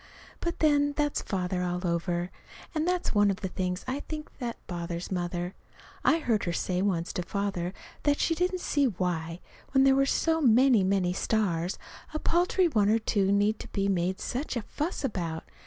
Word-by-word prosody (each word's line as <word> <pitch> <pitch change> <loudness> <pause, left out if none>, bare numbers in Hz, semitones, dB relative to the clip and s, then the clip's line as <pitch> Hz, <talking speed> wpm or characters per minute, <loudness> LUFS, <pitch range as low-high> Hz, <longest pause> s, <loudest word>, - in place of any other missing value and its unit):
But, 340 0 -3
then, 290 -2 +4
that's 295 0 0
Father 180 -2 -2
all 180 0 -2
over. 175 +1 -1 0.4
And 315 0 0
that's 360 0 0
one 205 -1 +4
of 195 +1 -2
the 190 - -1
things, 180 0 -3
I 260 +2 -1
think, 305 +1 -7
that 240 -3 -3
bothers 170 0 -4
Mother. 175 0 -2 0.5
I 320 - +5
heard 235 -10 0
her 175 - -1
say 180 +1 -1
once 180 -4 0
to - - -1
Father 185 -1 -2 0.3
that 290 -1 +2
she 330 - +2
didn't 360 +2 0
see 290 -4 +2
why, 175 -5 -2 0.3
when 270 -1 +6
there 270 0 +6
were 275 0 +3
so 325 +3 +2
many, 250 -3 +5
many 185 -2 +2
stars, 185 -4 0 0.4
a - - +2
paltry 350 +3 +2
one 210 -10 +2
or 220 - +5
two 210 -3 +1
more 195 - +3
need 205 +2 +2
to - - -7
be 195 -1 -1
made 185 0 0
such 260 +2 -3
a 230 - -3
fuss 300 - -3
about. 170 -10 -2
200 Hz, 190 wpm, -28 LUFS, 180-285 Hz, 0.5 s, when